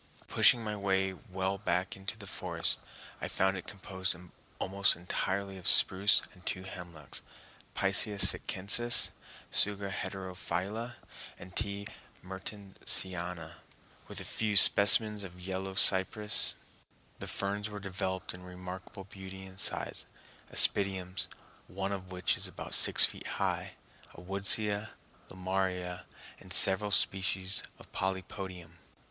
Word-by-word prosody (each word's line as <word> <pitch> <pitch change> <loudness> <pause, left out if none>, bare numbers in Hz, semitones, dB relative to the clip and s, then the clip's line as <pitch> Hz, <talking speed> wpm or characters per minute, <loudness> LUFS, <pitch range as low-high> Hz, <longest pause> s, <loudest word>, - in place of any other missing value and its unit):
Pushing 120 -1 +4
my 105 -1 -4
way 95 -1 -1
well 95 -1 -5
back 90 -1 -2
into 95 +2 -8
the 105 - -11
forest, 95 - -3 0.4
I - - -3
found 95 +1 0
it 90 - -8
composed 95 -2 -4 0.4
almost 100 +1 +1
entirely 95 +2 -4
of 90 - -8
spruce 100 +1 +5
and 90 - -19
two 95 0 -3
hemlocks 85 -6 -8 0.5
(Picea 100 +2 +5
sitchensis, 115 +6 +6 0.4
Tsuga 100 -1 +2
heterophylla 95 +5 -5 0.4
and 90 +1 -13
T. 100 -2 -3 0.4
mertensiana) 95 -3 -4 0.5
with - - -6
a - - -5
few 105 -2 -1
specimens 105 +1 +6
of 90 -1 -11
yellow 95 +1 -6
cypress. 95 +3 +5 0.6
The - - -7
ferns 100 +2 -4
were 105 -1 -8
developed 95 -1 -5
in 90 - -12
remarkable 90 +2 -10
beauty 95 -1 -11
and 95 0 -14
size—aspidiums, 95 -2 0 0.4
one 95 +1 -5
of 95 -2 -7
which 90 0 -1
is - - -5
about - - -9
six - - +6
feet - - -7
high, - - -3 0.4
a - - -12
woodsia, 100 +3 -1 0.4
lomaria, 95 -1 -4 0.3
and - - -16
several 95 +2 +5
species 95 -1 +1 0.2
of - - -17
polypodium. 95 -2 -6
95 Hz, 120 wpm, -30 LUFS, 90-100 Hz, 0.6 s, sitchensis